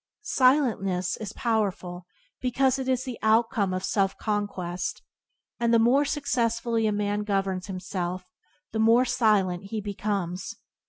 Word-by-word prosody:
Silentness 225 - +2
is 210 -2 -6
powerful 190 -6 -2 0.3
because 260 +1 +1
it 260 0 -3
is 255 -1 +1
the 255 -3 -6
outcome 220 -2 +2
of 185 0 -2
self 195 -1 0
conquest, 195 -5 -3 0.6
and 235 -1 +2
the 230 - +6
more 250 +6 +4
successfully 235 -5 0
a - - +1
man 205 0 -1
governs 195 -2 -1
himself 185 -1 -4 0.5
the 220 - -2
more 230 +3 +5
silent 200 -7 +2
he 215 +2 -4
becomes. 200 -3 -3
210 Hz, 130 wpm, -26 LUFS, 190-235 Hz, 0.6 s, the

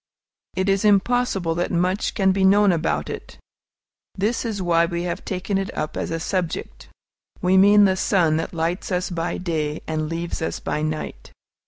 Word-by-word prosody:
It 190 +1 0
is 195 +1 +2
impossible 205 -3 +2
that 175 +2 -1
much 180 +3 0
can 190 -2 +3
be 190 0 0
known 200 +1 +5
about 165 -1 -1
it. - - -8 0.8
This 215 +6 0
is 220 -3 -3
why 170 -2 +2
we 170 0 -3
have 175 -1 -4
taken 195 +1 -2
it 195 - -3
up 155 - -3
as - - -3
a 165 - -2
subject. 165 - -3 0.5
We 180 +1 +3
mean 205 +2 +7
the 190 -1 +3
sun 170 -5 +2
that 165 - -3
lights 170 +4 -2
us 180 0 -1
by 170 0 -2
day 155 -4 -2
and 155 -1 -2
leaves 165 0 -4
us 160 - -2
by 150 - -2
night. 155 0 -4
180 Hz, 180 wpm, -22 LUFS, 165-195 Hz, 0.8 s, mean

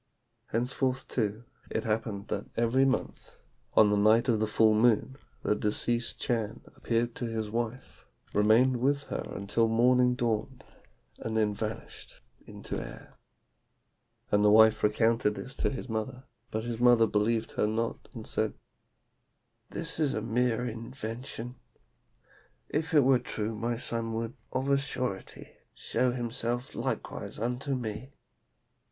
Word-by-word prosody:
"Henceforth, 130 +2 -1
too, 110 -1 -2 0.3
it - - -2
happened 110 -2 -2
that - - -3
every 120 +3 +3
month, 130 -1 -2 0.4
on 105 -1 +6
the - - +3
night 110 +4 +4
of 115 -4 +3
the 110 - +1
full 110 +1 +4
moon, 120 +4 +3 0.3
the 105 - +2
deceased 115 +3 0
Chan 115 -1 -1
appeared 120 0 0
to 120 - -4
his 110 -2 -3
wife, 120 +2 -4 0.3
remained 115 +5 +4
with 140 +3 +1
her - - -1
until 100 +4 0
morning 125 +2 +4
dawned, 120 +2 -2 0.6
and 110 0 -3
then 105 -1 +2
vanished 110 +1 -6 0.3
into - - -5
air. - - -11 1.2
And 105 0 +4
the 105 - +6
wife 110 +1 +6
recounted 110 0 +2
this 135 - -7
to - - +1
his 130 -1 -5
mother, 125 +3 -4 0.3
but 110 0 -3
his 120 -1 -4
mother 120 -2 +6
believed 110 +1 0
her - - +1
not, 115 +2 -2
and - - -8
said, - - -1 1.1
'This 165 -1 -1
is 145 -3 +2
a 110 - -1
mere 120 +1 +1
invention. 115 +1 -6 1.1
If 160 +2 -1
it 145 - +7
were 130 -1 +5
true 110 -1 -3
my 115 +2 -2
son 115 -1 -1
would, 115 +1 -3 0.2
of 130 +1 -1
a 140 0 +4
surety, 130 -8 -4 0.2
show 125 -1 0
himself 120 0 -3
likewise - - -4
unto 125 +5 -2
me. 120 +2 -5
115 Hz, 140 wpm, -29 LUFS, 110-125 Hz, 1.2 s, it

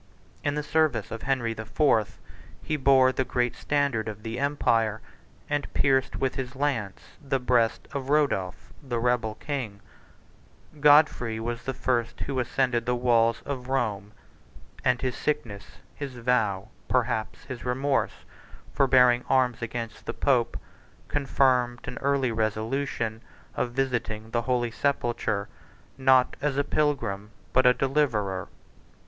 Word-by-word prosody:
44 - - 0
In 145 - -2
the 150 - -2
service 155 -3 +1
of 115 - -5
Henry 130 -4 0
the 110 - -6
Fourth, 110 -2 +1 0.5
he 155 - -1
bore 135 -2 +5
the 130 - 0
great 125 -1 -1
standard 140 -7 0
of 105 0 -8
the 115 +2 -4
empire, 115 -6 +1 0.5
and 145 -1 -2
pierced 135 -1 +2
with 135 - -1
his 130 0 -5
lance 130 -8 -2 0.2
the 135 -1 0
breast 120 -2 +1
of 135 -1 -4
Rodolph, 140 -11 0
the 130 -4 -3
rebel 115 -2 0
king: 120 -7 -4 1.0
Godfrey 145 -6 +4
was 115 +1 -3
the 130 - -3
first 120 -3 -1
who 135 -2 -2
ascended 125 -1 0
the 125 - +2
walls 115 -2 +2
of 130 -3 -5
Rome; 105 -6 -1 0.7
and 125 -1 +2
his 130 -1 -2
sickness, 110 -10 -3 0.3
his 140 -3 -6
vow, 110 -5 0 0.2
perhaps 120 -3 -1
his 130 -3 -8
remorse 135 +2 -1 0.5
for 135 - +3
bearing 125 -1 +5
arms 125 -3 +2
against 115 -1 -5
the - - -3
pope, 125 -4 +1 0.5
confirmed 130 -3 +2
an 125 - -5
early 140 -3 +1
resolution 110 +1 -2 0.3
of 120 - -2
visiting 120 -4 -2
the 120 - +1
holy 120 -1 0
sepulchre, 120 -5 -1 0.5
not 130 -1 +4
as 140 -1 0
a 140 - +3
pilgrim, 115 -10 -1 0.2
but 130 0 +5
a 125 - +7
deliverer. 115 -10 0
125 Hz, 140 wpm, -27 LUFS, 115-135 Hz, 1.0 s, a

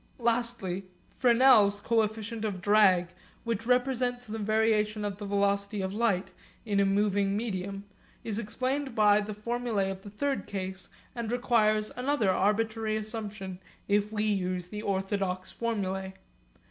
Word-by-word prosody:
Lastly 235 -6 -1 0.3
Fresnel's 235 -5 +6
coefficient 220 0 -1
of 205 -4 -2
drag 190 -3 +4 0.3
which 230 -1 -3
represents 250 -1 +1
the 220 0 -5
variation 215 0 +1
of 200 -1 -4
the 205 - -5
velocity 200 +1 0
of 190 0 -3
light 205 -4 0 0.3
in 205 -2 +1
a 200 - +4
moving 200 0 +1
medium 200 -3 -3 0.4
is 220 -1 -2
explained 255 +4 -2
by 210 -1 +5
the 210 0 -5
formulae 220 -3 -1
of 190 0 -7
the 205 - -10
third 275 +6 -2
case, 190 -1 -5 0.2
and 235 -3 -4
requires 215 -4 +2
another 250 -5 +1
arbitrary 215 +3 +1
assumption 210 -4 -5 0.3
if 205 +1 +1
we 210 -1 -1
use 185 -4 -1
the 210 +1 -5
orthodox 190 -2 -2
formulae. 190 -4 -3
210 Hz, 135 wpm, -29 LUFS, 200-230 Hz, 0.4 s, Fresnel's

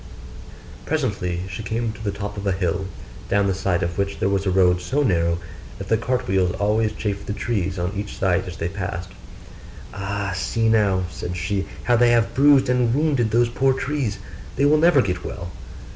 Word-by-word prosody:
Presently 100 - -1
she 95 +3 -6
came 115 +1 -2
to 110 +1 -11
the 105 - -1
top 100 +1 -5
of 100 0 -4
a - - +3
hill, 95 0 -1 0.4
down 100 0 +3
the 100 - +1
side 95 -2 0
of 85 +2 -3
which 100 0 -1
there 95 - +1
was 100 0 0
a - - +3
road 90 -1 +3
so 135 +12 0
narrow 85 -7 +2 0.4
that 100 - -7
the 110 - +4
cart 125 +2 -1
wheels 95 -2 +2
always 105 +1 +1
chafed 100 -2 -4
the 100 - -2
trees 100 -4 -2
on 90 +2 -2
each 100 +1 -5
side 95 -2 +1
as 90 - -7
they 85 - -2
passed. 90 0 -5 0.8
'Ah, 100 +1 -3
see 115 +4 0
now,' 100 -4 +3
said 90 +1 -5
she, 95 +2 -2 0.2
'how 120 - +3
they 120 +1 +5
have 120 -1 +3
bruised 140 -1 +5
and 125 -1 +2
wounded 140 -6 +2
those 120 +2 +3
poor 130 +2 +2
trees; 130 -5 -2 0.4
they 140 - +2
will 150 +1 +5
never 165 -4 +5
get 90 -3 -2
well. 90 -2 -6
100 Hz, 200 wpm, -22 LUFS, 95-120 Hz, 0.8 s, they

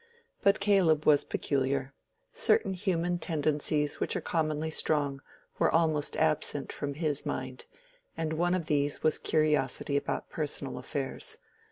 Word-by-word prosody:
But 200 +1 +4
Caleb 190 -7 +3
was 150 -2 +5
peculiar: 135 -1 -1 0.4
certain 440 - +2
human 175 -2 -1
tendencies 150 -2 0
which - - 0
are - - 0
commonly 155 -1 -1
strong 145 -3 +1 0.4
were - - +4
almost 155 -3 +1
absent 155 -2 0
from 145 -1 -4
his 150 -2 +1
mind; 130 0 -5 0.5
and 160 -1 -2
one 175 +3 +1
of 175 -3 -2
these 145 -1 0
was 155 - +2
curiosity 150 -2 +1
about - - -3
personal 145 -3 -3
affairs. 135 -2 -3
155 Hz, 135 wpm, -29 LUFS, 145-165 Hz, 0.5 s, was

